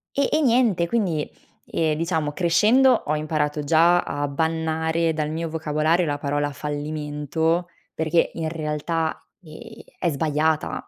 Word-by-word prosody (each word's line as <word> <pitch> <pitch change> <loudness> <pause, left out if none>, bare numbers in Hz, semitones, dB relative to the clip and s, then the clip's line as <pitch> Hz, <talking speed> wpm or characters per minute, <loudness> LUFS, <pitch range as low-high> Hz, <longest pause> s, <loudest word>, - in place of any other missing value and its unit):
E 280 - +1
e 310 - +2
niente, 230 - +3
quindi, 170 -8 0 0.4
ehm, 155 -2 0
diciamo 160 -3 -1
crescendo 215 - +4
ho 150 - 0
imparato 150 -1 -1
già 170 +4 +4
a 145 0 -3
bannare 160 +2 0
dal 155 -1 -2
mio 165 +1 -3
vocabolario 160 +2 +1
la 145 -2 -2
parola 145 +1 -1
fallimento, 150 +3 -2 0.3
perché 160 +1 +1
in 165 -1 -2
realtà, 160 +1 -2 0.2
ehm, 155 -3 -12 0.4
è 175 - 0
sbagliata, 155 +1 -1
160 Hz, 130 wpm, -23 LUFS, 150-170 Hz, 0.4 s, crescendo